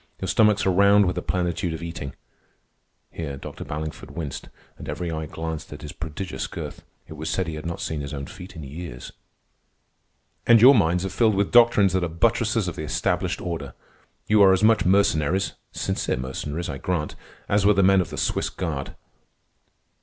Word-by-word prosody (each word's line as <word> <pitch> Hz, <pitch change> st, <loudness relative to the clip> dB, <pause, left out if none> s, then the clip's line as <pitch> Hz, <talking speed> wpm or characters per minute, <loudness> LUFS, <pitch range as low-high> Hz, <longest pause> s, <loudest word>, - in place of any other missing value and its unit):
Your 95 Hz, -, -3 dB
stomachs 105 Hz, +4 st, +3 dB
are 95 Hz, -, +3 dB
round 100 Hz, +2 st, +5 dB
with 90 Hz, -, -1 dB
the 90 Hz, -, -2 dB
plenitude 85 Hz, -1 st, -1 dB
of 80 Hz, -, -8 dB
eating." 70 Hz, -5 st, -6 dB, 1.0 s
(Here 70 Hz, -4 st, -5 dB
Dr. -, -, -8 dB
Ballingford 75 Hz, +1 st, -6 dB
winced, 75 Hz, -6 st, -6 dB, 0.3 s
and -, -, -8 dB
every 85 Hz, +3 st, -3 dB
eye 80 Hz, -1 st, -4 dB
glanced 80 Hz, 0 st, -6 dB
at 75 Hz, -, -9 dB
his 75 Hz, -, -6 dB
prodigious 90 Hz, +2 st, -5 dB
girth. -, -, -7 dB, 0.2 s
It -, -, -9 dB
was 80 Hz, +1 st, -5 dB
said 95 Hz, +3 st, 0 dB
he 80 Hz, -, -5 dB
had 75 Hz, +1 st, -6 dB
not 85 Hz, -, -4 dB
seen 80 Hz, -2 st, -3 dB
his 70 Hz, 0 st, -6 dB
own 70 Hz, -2 st, -5 dB
feet 90 Hz, +7 st, -11 dB
in 80 Hz, -, -8 dB
years.) 70 Hz, -2 st, -8 dB, 1.4 s
"And 120 Hz, -1 st, +7 dB
your 130 Hz, +5 st, +9 dB
minds 90 Hz, -5 st, +2 dB
are -, -, -2 dB
filled 110 Hz, +2 st, +2 dB
with 100 Hz, 0 st, 0 dB
doctrines 115 Hz, -6 st, +5 dB
that 95 Hz, -1 st, +1 dB
are -, -, +1 dB
buttresses 110 Hz, +4 st, +1 dB
of 90 Hz, -, -4 dB
the -, -, -5 dB
established 75 Hz, -, -1 dB
order. -, -, -5 dB, 0.5 s
You 105 Hz, -1 st, +4 dB
are 95 Hz, -1 st, +7 dB
as 95 Hz, -, +1 dB
much 110 Hz, 0 st, +4 dB
mercenaries 95 Hz, -2 st, +2 dB, 0.2 s
(sincere -, -, -2 dB
mercenaries, 75 Hz, +6 st, -4 dB
I 70 Hz, -, -5 dB
grant) 85 Hz, -5 st, -2 dB, 0.3 s
as 100 Hz, 0 st, +2 dB
were 105 Hz, -, +5 dB
the 100 Hz, -, +4 dB
men 95 Hz, 0 st, +5 dB
of 90 Hz, -, -4 dB
the -, -, -7 dB
Swiss -, -, 0 dB
Guard. 75 Hz, -7 st, -4 dB
85 Hz, 190 wpm, -24 LUFS, 80-100 Hz, 1.4 s, your